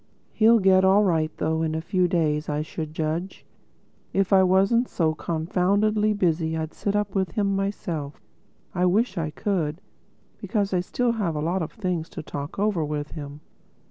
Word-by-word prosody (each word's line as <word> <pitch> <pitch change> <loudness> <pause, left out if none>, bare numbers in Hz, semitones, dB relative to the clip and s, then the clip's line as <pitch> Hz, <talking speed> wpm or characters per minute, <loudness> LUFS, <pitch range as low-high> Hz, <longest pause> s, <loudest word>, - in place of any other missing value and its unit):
He'll 230 +1 +5
get 190 -2 +4
all 195 +2 +5
right 160 -5 +1
though—in 160 0 0
a - - -1
few 180 +2 +1
days 155 -3 0
I 150 0 -1
should 155 0 -6
judge. 160 +4 -3 0.7
If 195 0 +1
I 190 - +7
wasn't 195 +6 +3
so 160 -3 +1
confoundedly 200 +7 +1
busy 165 -4 0
I'd 160 0 -4
sit 200 0 -2
up 205 -2 -1
with 190 -4 -1
him 200 -2 +1
myself. 175 -7 -3 0.5
I 180 +1 +2
wish 205 +3 +1
I 155 -2 -1
could, 165 -2 -2 0.6
because 200 -4 -1
I 180 - +3
still 240 +7 0
have 200 -8 -1
a - - -2
lot 170 +5 -1
of 160 - -4
things 180 -6 -3
to - - -4
talk 145 0 -6
over 200 -5 +1
with 150 0 -4
him." 145 -1 -8
180 Hz, 175 wpm, -25 LUFS, 160-200 Hz, 0.7 s, I